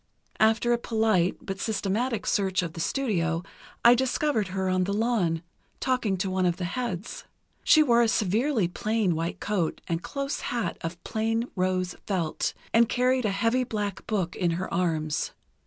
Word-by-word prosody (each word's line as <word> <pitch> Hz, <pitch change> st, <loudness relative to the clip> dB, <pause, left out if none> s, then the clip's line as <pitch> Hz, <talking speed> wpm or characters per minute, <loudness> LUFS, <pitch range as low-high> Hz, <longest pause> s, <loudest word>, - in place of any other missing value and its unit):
After 225 Hz, +2 st, +4 dB
a 235 Hz, -, +1 dB
polite 220 Hz, -6 st, +1 dB
but 195 Hz, 0 st, -5 dB
systematic 220 Hz, +2 st, -1 dB
search 190 Hz, -3 st, +1 dB
of 165 Hz, -2 st, -5 dB
the 170 Hz, -, -8 dB
studio 170 Hz, -6 st, 0 dB, 0.4 s
I 235 Hz, -, +10 dB
discovered 260 Hz, -2 st, +1 dB
her 190 Hz, 0 st, -2 dB
on 185 Hz, 0 st, +2 dB
the 200 Hz, -, -1 dB
lawn, 205 Hz, -8 st, +1 dB, 0.4 s
talking 250 Hz, -7 st, 0 dB
to 190 Hz, +1 st, -1 dB
one 185 Hz, -1 st, +2 dB
of 175 Hz, -, 0 dB
the 180 Hz, -, -3 dB
heads. 200 Hz, 0 st, -4 dB, 0.4 s
She 310 Hz, -, +6 dB
wore 240 Hz, -4 st, +4 dB
a 235 Hz, -, +4 dB
severely 220 Hz, +1 st, +1 dB
plain 215 Hz, +1 st, 0 dB
white 165 Hz, +1 st, -3 dB
coat 190 Hz, -6 st, -1 dB
and 165 Hz, -1 st, -1 dB
a -, -, -22 dB
close 275 Hz, +5 st, -3 dB
hat 235 Hz, -2 st, -2 dB
of 170 Hz, +1 st, -6 dB
plain 225 Hz, +2 st, -1 dB
rose 185 Hz, -1 st, 0 dB
felt, 175 Hz, -6 st, -1 dB, 0.2 s
and 230 Hz, 0 st, +5 dB
carried 255 Hz, 0 st, +2 dB
a -, -, +2 dB
heavy 230 Hz, +6 st, +1 dB
black 210 Hz, -5 st, -4 dB
book 190 Hz, -6 st, -1 dB
in 175 Hz, -, +1 dB
her 185 Hz, -, -4 dB
arms. 160 Hz, -4 st, 0 dB
205 Hz, 170 wpm, -27 LUFS, 180-235 Hz, 0.4 s, I